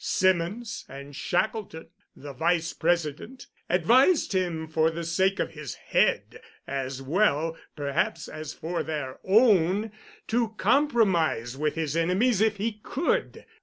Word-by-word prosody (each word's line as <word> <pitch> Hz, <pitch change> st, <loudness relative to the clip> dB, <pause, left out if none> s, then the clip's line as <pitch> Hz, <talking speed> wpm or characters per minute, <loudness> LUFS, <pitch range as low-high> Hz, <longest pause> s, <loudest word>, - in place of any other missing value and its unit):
Symonds, 185 Hz, +5 st, 0 dB
and 140 Hz, +1 st, -10 dB
Shackelton, 175 Hz, +3 st, -2 dB, 0.3 s
the 140 Hz, 0 st, -9 dB
vice 165 Hz, +3 st, 0 dB
president, 170 Hz, -, -2 dB, 0.2 s
advised 240 Hz, -, +4 dB
him 175 Hz, -4 st, -1 dB
for 160 Hz, 0 st, +2 dB
the 165 Hz, +1 st, -5 dB
sake 190 Hz, +4 st, +1 dB
of -, -, -1 dB
his 150 Hz, -4 st, -7 dB
head, -, -, 0 dB, 0.2 s
as 135 Hz, 0 st, -4 dB
well, 165 Hz, 0 st, +1 dB, 0.2 s
perhaps, 145 Hz, +2 st, -1 dB
as 155 Hz, -1 st, -7 dB
for 170 Hz, +2 st, -4 dB
their 145 Hz, -5 st, -5 dB
own, 205 Hz, -1 st, +3 dB, 0.4 s
to 225 Hz, -1 st, 0 dB
compromise 190 Hz, -, +2 dB
with 150 Hz, +2 st, -1 dB
his 160 Hz, -2 st, -2 dB
enemies 190 Hz, +7 st, +2 dB
if 220 Hz, -1 st, +2 dB
he 210 Hz, +1 st, -3 dB
could. 345 Hz, -, -2 dB
170 Hz, 130 wpm, -26 LUFS, 155-215 Hz, 0.4 s, advised